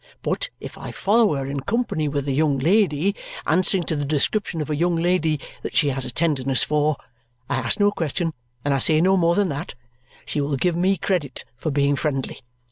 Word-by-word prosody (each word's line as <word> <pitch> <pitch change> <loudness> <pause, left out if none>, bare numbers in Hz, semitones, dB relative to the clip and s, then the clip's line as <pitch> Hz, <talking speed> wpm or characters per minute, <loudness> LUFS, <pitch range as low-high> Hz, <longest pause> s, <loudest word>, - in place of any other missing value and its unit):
But - - -1
if - - -9
I - - -6
follow 210 -4 +3
her 135 -1 -2
in 140 +1 -3
company 200 - -1
with 145 -1 -2
a - - +1
young 145 0 +2
lady, 180 +3 +2 0.3
answering 185 +3 +2
to 160 - -2
the 145 - -2
description 160 +5 0
of 155 0 -3
a - - +1
young 170 +3 +1
lady 165 -3 +1 0.2
that - - -6
she 145 - +4
has 135 -1 -2
a 125 - -4
tenderness 135 -4 +1
for 150 -1 +1 0.5
I 140 - -1
ask 130 - -1
no 205 0 +4
question, 165 -1 -2 0.3
and 145 - +2
I 135 - +1
say 155 +3 +3
no 190 +3 +4
more 170 -2 +3
than 205 -3 +2
that 145 +1 -5 0.5
she 150 - -1
will 140 0 -1
give 175 +4 +1
me 190 +3 +2
credit 160 -7 -2
for 125 - -3
being 140 0 +2
friendly. 140 -3 -2
155 Hz, 210 wpm, -23 LUFS, 140-180 Hz, 0.5 s, she